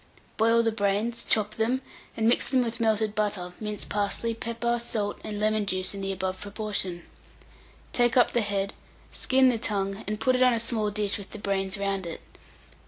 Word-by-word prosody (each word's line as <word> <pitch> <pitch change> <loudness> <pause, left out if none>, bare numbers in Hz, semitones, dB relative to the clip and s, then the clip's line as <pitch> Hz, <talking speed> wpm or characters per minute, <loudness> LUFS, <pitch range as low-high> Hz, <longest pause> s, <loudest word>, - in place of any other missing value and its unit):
Boil 230 +1 +4
the 225 - +2
brains, 215 +2 0
chop 215 -1 +1
them, 245 +4 +1 0.3
and 225 0 +2
mix 235 - +3
with 260 -2 +4 0.2
them - - +1
melted 220 -1 +2
butter, 205 -4 -1
minced 210 -1 -4
parsley, 205 +3 -1
pepper, 235 +1 -1
salt, 220 -3 -2
and 210 -1 -4
lemon 215 -1 +1
juice 185 0 0
in 200 - -6
the 195 0 -1
above 190 0 -3
proportion. 200 -4 -2 0.9
Take 240 0 +3
up 245 - +5
the 240 - +2
head, 200 -1 -1 0.4
skin 260 0 +3
the 235 -3 0
tongue, 195 -2 -2
and 210 0 -2
put 255 0 +3
it 255 - +1
on 250 -2 +6
a - - 0
small 225 -2 0
dish 205 -1 0
with 200 - -9
the - - -6
brains 195 -1 -1
round 195 -2 -2
it. 165 - -6
210 Hz, 190 wpm, -27 LUFS, 200-230 Hz, 0.9 s, on